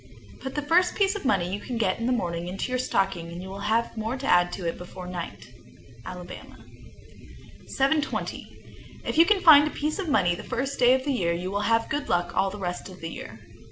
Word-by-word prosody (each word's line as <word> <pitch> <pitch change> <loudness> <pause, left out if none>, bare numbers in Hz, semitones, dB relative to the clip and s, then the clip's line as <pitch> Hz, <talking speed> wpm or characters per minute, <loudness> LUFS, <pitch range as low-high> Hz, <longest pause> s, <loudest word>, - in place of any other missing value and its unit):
Put 265 0 -6
the 295 - -1
first 355 +4 +3
piece 395 -1 +2
of 405 - -6
money 185 -9 +1
you 205 - -2 0.2
get 225 - +1
in 230 - -1
the - - +2
morning 175 -7 -1
into 195 +7 -4
your 255 - 0
stocking, 175 -8 -1
and 170 - -7
you 185 +1 -7
will 195 +1 -7
have 230 +1 +1
more 225 +3 -3
to 270 - -6
add 175 0 +4
to 180 -3 -4
it 165 - -1
before 180 +1 -9
night. 180 -1 -7 0.5
Alabama. 180 +2 -9 1.1
720. 290 +3 -3
If - - 0
you 330 - +9 0.2
find 300 -4 +8
a - - -1
piece 305 +5 -3
of 370 -5 -2
money 175 -11 +3
the 175 - -6
first 270 +3 -3
day 250 +1 +6
of 260 - -2
the 280 0 0
year, 170 -9 +1
you 180 +2 -3
will 200 +1 -1
have 225 0 +3
good 295 -1 -3
luck 175 0 0
all 195 - +2
the 205 - -8
rest 180 -1 -4
of 185 -1 -12
the 165 - -5
year. - - -9
220 Hz, 225 wpm, -26 LUFS, 180-275 Hz, 1.1 s, you